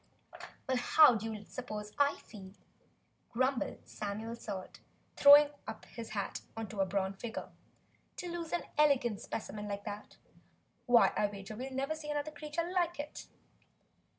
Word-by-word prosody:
"Well, 260 -1 +2
how 255 +3 +7
do 225 0 -2
you 210 -1 -7
suppose 210 -4 -6
I 285 0 +4
feel," 190 -3 -12 0.8
grumbled 255 +2 -1
Samuel 215 +3 -4
Salt, 200 -5 -7 0.4
throwing 290 +1 +9 0.4
his 230 -1 -7
hat 205 -2 -3 0.2
up 225 -1 -5
on 205 - -6
a 195 - +4
bronze 195 0 -1
figure, 230 -1 -5 0.6
"to 360 - -5
lose 340 -1 -5
an 350 - 0 0.2
elegant 255 -8 +3
specimen 210 -1 -5
like 200 0 -4
that? 210 -1 -7 0.7
Why, 245 -1 +6
I'll 210 -1 +2
wager 200 +1 -8
we'll 260 +4 -5
never 270 +3 -1
see 310 -1 -7
another 295 +1 -2
creature 305 +3 -3
like 350 -2 0
it!" 290 - -6
235 Hz, 150 wpm, -33 LUFS, 210-290 Hz, 0.8 s, throwing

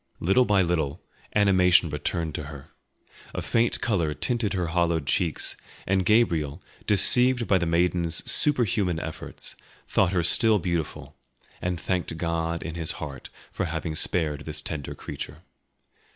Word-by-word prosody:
Little 95 +9 +3
by 100 -3 +3
little 80 -5 -2 0.3
animation 90 -5 +4
returned 80 +2 -2
to 75 - -5
her; 70 -1 -11 0.6
a - - -2
faint 115 +1 +1
colour 85 -9 0
tinted 115 -5 -1
her 90 -3 -1
hollowed 85 -3 +1
cheeks, 80 +2 -1 0.3
and 95 0 +1
Gabriel, 85 -10 +1 0.2
deceived 125 +4 +4
by 95 - +3
the 85 - -1
maiden's 85 0 +1
super 145 -4 +6
human 90 -5 0
efforts, 80 -1 -7 0.3
thought 95 -2 +2
her 90 -3 +1
still 110 +5 +4
beautiful, 85 -4 -4 0.4
and 90 -1 -2
thanked 90 -1 -2
God 85 0 -2
in 85 - -5
his 80 -1 -3
heart 70 -3 -8 0.2
for - - -2
having 80 -1 -4
spared 75 -2 -1
this 75 -1 -3
tender 75 -1 -6
creature. 80 - -8
85 Hz, 145 wpm, -25 LUFS, 80-95 Hz, 0.6 s, super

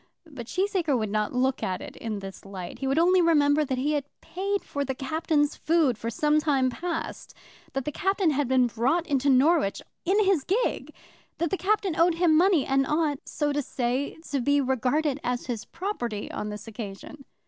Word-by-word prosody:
But 270 -8 -9
Cheesacre 365 -5 0
would 215 -3 -2
not 210 0 0
look 260 +1 0
at 185 -1 -2
it - - -9
in 220 -2 -4
this 195 0 -9
light. 190 +1 -8
He 270 - -2
would 270 +2 +1
only 360 +2 +5
remember 300 -3 +4
that 265 -3 -2
he 280 +4 0
had 290 -2 -1
paid 395 +3 -3
for 285 - -3
the 265 -1 -3
Captain's 295 +1 0
food 315 -6 +2
for 225 +2 -4
some 300 +5 +2
time 275 -4 +1
past, 340 +3 -5 0.4
that 270 -1 -2
the 300 - -2
Captain 385 +1 +1
had 290 -1 0
been 255 -1 +4
brought 250 +9 0
into 280 -3 +1
Norwich 275 - +3 0.2
in 380 +4 +2
his 380 -7 +3
gig, 460 - -1 0.5
that 335 -1 -1
the - - +2
Captain 390 -3 0
owed 335 +1 +3
him 335 -2 +3
money, 350 -2 +4
and 270 0 +1
ought, 300 -2 0
so 290 -1 -1
to 290 - 0
say, 255 +1 -2
to 280 -3 0
be 285 +3 +3
regarded 265 +2 0
as 245 0 -2
his 235 -4 -4
property 245 - -4
on 210 - -4
the 210 0 -5
occasion. 225 +5 -8
285 Hz, 195 wpm, -26 LUFS, 250-330 Hz, 0.5 s, only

